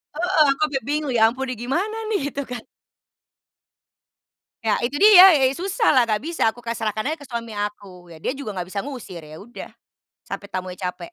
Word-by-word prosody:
Heeh, 345 -2 +3
aku 275 - -2
sampai 275 -3 -3
bingung, 295 -2 -1
"Ya 225 - +1
ampun, 265 +2 -5
ini 255 - -3
gimana 390 - -1
nih?" 410 - +1
Gitu 280 - -4
kan. 240 -2 -5 2.0
Ya, 215 -2 +1
itu 245 +4 -2
dia, 420 +7 +6
ya 380 - +12 0.2
ya 260 - +4
susahlah, 380 - +2
nggak 215 +3 -1
bisa, 330 -7 0
aku 240 +2 -3
kayak 230 0 -4
serahkan 215 -1 -2
aja 320 - -3
ke 285 - -12
suami 235 -2 -5
aku, 205 -4 -6
ya, 165 - -13
dia - - 0
juga 265 -8 -7
gak 180 0 -5
bisa 200 - -3
ngusir, 240 -9 -7
ya 155 0 -12
udah. 240 +2 -10 0.5
Sampai 200 - -7
tamunya 185 -1 -5
capek. 180 - -5
240 Hz, 200 wpm, -22 LUFS, 205-290 Hz, 2.0 s, ya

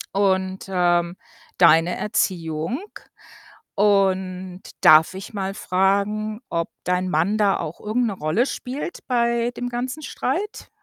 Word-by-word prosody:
Und, 190 -1 +1
ähm, 175 -1 +1 0.4
deine 170 0 +5
Erziehung? 170 - -1 1.0
Und 190 -2 +1 0.2
darf 155 +3 +6
ich 190 +4 -8
mal 195 -1 -3
fragen, 205 +4 0
ob 170 0 -2
dein 180 0 0
Mann 180 +6 +1
da 200 -2 +3
auch 165 0 -6
irgend 230 +4 0
'ne 210 - -2
Rolle 180 +7 0
spielt 275 +5 -5
bei 235 -1 +1
dem 245 0 -3
ganzen 255 +5 -4
Streit? 420 +7 -3
195 Hz, 120 wpm, -22 LUFS, 180-215 Hz, 1.0 s, darf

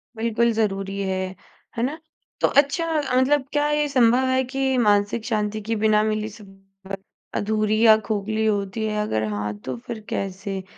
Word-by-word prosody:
बिल्कुल 230 +1 +1
ज़रूरी 195 -2 -1
है। 190 -1 -1 0.5
है 230 - 0
ना? 295 +6 -2 0.4
तो - - +5
अच्छा 290 +4 +1 0.3
मतलब 265 +2 +3
क्या 295 0 +2
ये 295 0 +1
संभव 255 -1 +4
है 260 0 +2
कि 265 -1 +1
मानसिक 210 0 +2
शांति 215 -2 -1
के 225 +2 -2
बिना 215 -1 +4
मिली 215 0 -1
सफलता 195 -1 -11 0.4
अधूरी 215 +1 +1
या 220 -1 +8
खोखली 215 +1 -1
होती 205 0 -1
है 210 -1 -1
अगर 110 - -1
हाँ, 105 0 -2
तो 125 +5 -5
फ़िर 220 - -7
कैसे? 195 0 -4
215 Hz, 160 wpm, -23 LUFS, 195-235 Hz, 0.5 s, या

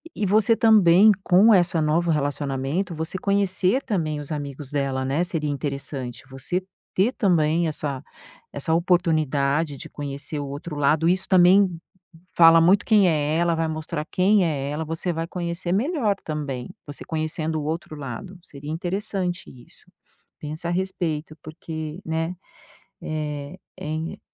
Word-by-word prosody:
e 210 - -1
você 215 +3 +3
também 210 -2 +6
com 200 +5 +6
essa 175 -3 +3
novo 160 +3 +1
relacionamento, 145 +3 -1
você 160 +4 -4
conhecer 200 +4 +1
também 160 - -2
os 145 0 -9
amigos 145 -2 -6
dela, 135 -2 -1
né, 140 +6 0
seria 160 -4 -2
interessante. 140 -3 -5
Você 135 +8 -3 0.3
ter 200 +6 +3
também 170 - +2
essa 145 -3 -3 0.5
essa 145 +3 -1
oportunidade 155 -4 +1
de - - -10
conhecer 145 +1 -6
o 145 - -4
outro 145 +3 -6
lado. 145 +3 +2
Isso 185 +2 +1
também 185 -1 +5 0.6
fala 165 -1 +8
muito 190 +5 +4
quem 210 -4 +5
é 155 -1 +1
ela. 170 0 +2
Vai 165 0 0
mostrar 155 0 -4
quem 195 +2 +3
é 140 -4 -2
ela. 150 +2 -3
Você 165 +3 -3
vai 165 0 -3
conhecer 175 0 -4
melhor 230 - +1
também. 145 -5 -4 0.2
Você 145 -1 -9
conhecendo 155 0 -2
o - - -5
outro 155 +1 -4
lado. 145 +7 -7
Seria 145 -3 -10
interessante 185 +1 -3
isso. 120 -2 -14 0.6
Pensa 155 +3 -5
a - - 0
respeito 175 -4 -2
porque, 155 +1 -7
né, 165 +2 -2 0.7
eh, 150 +1 -5 0.2
em 155 +2 -4
160 Hz, 145 wpm, -24 LUFS, 145-180 Hz, 0.7 s, fala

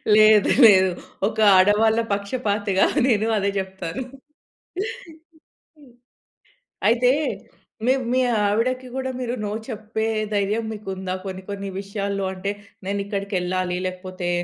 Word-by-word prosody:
లేదు. 215 -1 +6 0.2
లేదు. 190 -3 +7 0.4
ఒక 220 - -5 0.2
ఆడవాళ్ళ 210 +4 +4
పక్షపాతిగా 205 -1 0 0.2
నేను 220 -3 +2
అదే 200 0 +1
చెప్తాను. 190 +2 -5 1.7
హ్మ్. 275 -5 -19 0.9
అయితే, 245 +2 +4 0.8
మివ్ 260 0 +2
మీ 255 - +3 0.3
ఆవిడకి 255 +5 0
గూడా 260 0 -2
మీరు 245 -1 -2
నో 205 - -3 0.2
చెప్పే 220 0 -3 0.3
ధైర్యం 205 +2 0
మీకుందా 190 -3 -5
కొన్ని 190 -1 -6
కొన్ని 200 -1 -4
విషయాల్లో? 200 0 -3
అంటే, 190 +2 -3 0.4
నేనిక్కడికెళ్ళాలి, 195 -3 -2
లేకపోతే 185 -1 -5
200 Hz, 105 wpm, -23 LUFS, 190-225 Hz, 1.7 s, లేదు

